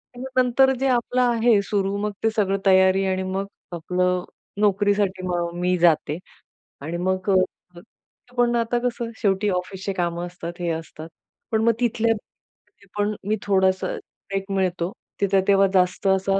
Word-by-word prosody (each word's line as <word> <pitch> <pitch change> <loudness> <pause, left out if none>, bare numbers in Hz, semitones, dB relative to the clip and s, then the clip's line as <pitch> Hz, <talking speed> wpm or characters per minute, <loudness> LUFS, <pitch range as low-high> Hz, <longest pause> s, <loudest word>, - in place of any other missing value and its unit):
आणि 245 - -7
नंतर 255 +1 +4
जे 270 - +1
आपलं 250 +1 +1
आहे 235 -3 +3
सुरू 200 -1 -1
मग 210 +1 -2
ते 225 - +4
सगळं 195 -2 +1
तयारी 190 0 +5
आणि 190 0 0
मग 190 +1 -2 0.3
आपलं 180 +2 0 0.4
नोकरीसाठी 200 -2 +2
मग 175 -1 -1
मी 180 0 +1
जाते. 160 -2 +2 0.6
आणि 160 +4 -4
मग 185 +2 -1
अ, 185 -1 -1 0.6
पण 240 0 +3
आता 235 +1 +1
कसं 235 -1 -2
शेवटी 200 0 +2
ऑफिसचं 190 +1 -3
कामं 175 0 -1
असतात, 175 -1 -7
हे 175 - -1
असतात. 160 0 -7 0.4
पण 220 -1 +2
मग 230 0 +4
तिथल्या 230 -1 +2 0.8
पण 205 +1 0
मी 215 - +2
थोडासा 190 -1 +2
ब्रेक 195 0 -7
मिळतो 185 -2 0 0.3
तिथे 195 -1 +3
तेव्हा 195 -1 +5
जास्त 185 +2 +2
असा 195 0 +2
195 Hz, 150 wpm, -23 LUFS, 180-215 Hz, 0.8 s, तयारी